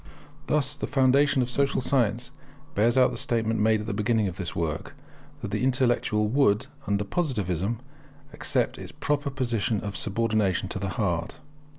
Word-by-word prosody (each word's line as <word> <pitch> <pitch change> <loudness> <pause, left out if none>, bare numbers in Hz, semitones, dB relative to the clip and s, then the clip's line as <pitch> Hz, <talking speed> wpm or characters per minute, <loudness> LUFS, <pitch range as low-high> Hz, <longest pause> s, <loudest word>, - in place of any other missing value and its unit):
Thus 150 -2 +1
the - - -4
foundation 135 0 +3
of 120 - -4
social 140 +2 +1
science 125 -3 0 0.4
bears 115 +5 +2
out 130 - +5
the - - -5
statement 115 -1 0
made 110 0 +3
at - - -6
the 110 - -3
beginning 105 +1 +1
of 90 -1 -5
this 90 -3 -3
work, 80 -2 -3 0.5
that - - -4
the 105 +4 -1
intellect 130 -2 +2
would, 105 +1 +2 0.2
under 100 0 +1
Positivism, 105 - -1 0.5
accept - - 0
its - - -8
proper 145 -1 -1
position 120 -5 -1
of 100 -1 -5
subordination 105 -3 0
to - - -3
the 100 0 -2
heart. 90 -7 -2
110 Hz, 165 wpm, -26 LUFS, 100-130 Hz, 0.5 s, out